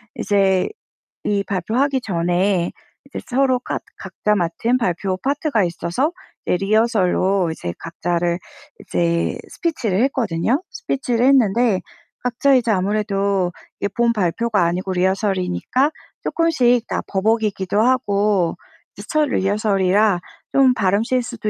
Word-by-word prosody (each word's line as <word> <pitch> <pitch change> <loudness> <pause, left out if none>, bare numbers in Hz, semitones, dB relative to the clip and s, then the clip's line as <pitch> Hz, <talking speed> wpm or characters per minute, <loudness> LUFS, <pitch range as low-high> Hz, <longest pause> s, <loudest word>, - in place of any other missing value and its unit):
이제 195 -2 +2 0.6
이 200 -1 0
발표하기 250 +9 0
전에 180 -2 0 0.4
이제 275 - -6
서로가 255 -1 +1 0.2
각자 210 - -2
맡은 190 +8 0
발표 185 -3 -1
파트가 280 - 0
있어서 175 - -1 0.3
이제 - - +1
리허설로 195 -3 +2
이제 85 - -5
각자를 170 +1 -2 0.4
이제 170 0 0
스피치를 230 - -1
했거든요. 245 - 0
스피치를 265 - -1
했는데 235 -5 +3 0.4
각자 250 +3 +2
이제 235 -3 +2
아무래도 200 -1 0 0.3
이게 200 - 0
본 235 0 +3
발표가 205 +1 +1
아니고 185 +3 -1
리허설이니까 190 - 0 0.3
쪼끔씩 250 -8 +2
다 - - -2
버벅이기도 210 -1 0
하고 205 -7 +2 0.4
이제 - - -9
첫 310 -1 +2
리허설이라 200 -1 +2 0.3
좀 265 -2 +5
발음 200 -2 +1
실수도 240 -3 -2
205 Hz, 285 characters per minute, -20 LUFS, 185-245 Hz, 0.6 s, 좀